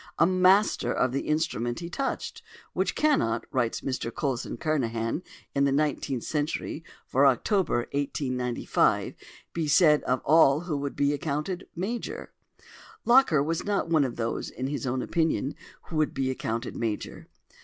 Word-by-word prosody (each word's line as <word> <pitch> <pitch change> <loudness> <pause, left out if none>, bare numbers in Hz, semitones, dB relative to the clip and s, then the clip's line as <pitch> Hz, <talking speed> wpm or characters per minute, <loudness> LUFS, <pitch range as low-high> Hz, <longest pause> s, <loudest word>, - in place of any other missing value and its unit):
] - - -45
a 165 - +5
master 185 - +3
of 130 - +1
the 135 - -3
instrument 150 -7 -1
he 170 - -5
touched, 270 +11 -3 0.3
which - - 0
cannot," 195 - +2
writes 120 -4 0
Mr 130 -3 -3
Coulson 130 -4 -3
Kernahan 115 -3 -1 0.3
in 140 - +2
the 140 - +2
Nineteenth 140 -3 0
Century 150 +1 -2 0.2
for 140 +2 +4
October 135 - +1
1895, 130 -3 0 0.4
"be 165 -2 -1
said 150 0 +5
of 130 0 +1
all 155 -1 +5
who 170 -3 -3
would 140 0 -3
be 140 0 +2
accounted 150 +5 -3
major." 210 +8 -4 0.7
Locker 235 - +5
was 165 +2 -1
not 200 -5 -1
of 140 -6 +2
those, 115 0 -3
in 130 - -5
his 140 -1 -3
own 125 0 -1
opinion, 160 -4 0 0.3
who 165 - -6
would 155 -1 +1
be 130 -1 0
accounted 115 -1 -3
major. 110 -3 -4
145 Hz, 150 wpm, -27 LUFS, 130-165 Hz, 0.7 s, a